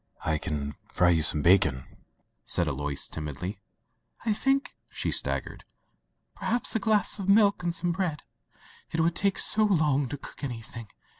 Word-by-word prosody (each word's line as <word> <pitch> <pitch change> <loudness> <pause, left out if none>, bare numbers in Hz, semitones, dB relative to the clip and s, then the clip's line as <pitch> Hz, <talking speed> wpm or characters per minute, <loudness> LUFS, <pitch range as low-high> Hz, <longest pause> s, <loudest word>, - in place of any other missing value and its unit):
"I 80 -1 0
can 75 -1 -4 0.2
fry 90 0 +2
you 80 -2 +2
some 75 -2 +8
bacon,'* 85 -8 +3 0.6
said 85 - -1
Alois 75 0 -3
timidly. 80 +6 -6 0.7
"I 225 - +1
diink,'* 270 +6 0 0.2
she - - -3
suggested, - - -2 0.7
"perhaps 240 0 -1
a - - +2
glass 215 0 +1
of 195 0 -4
milk 200 -1 +4
and 175 -1 -1
some 170 +1 -2
bread 170 -4 -3 0.3
— - - -25
it 165 - -1
would 165 +1 +1
take 200 +1 0
so 215 - +5
long 150 - +1
to 145 - -5
cook 140 - -13
anything. 115 -3 -7
145 Hz, 160 wpm, -27 LUFS, -, 0.7 s, some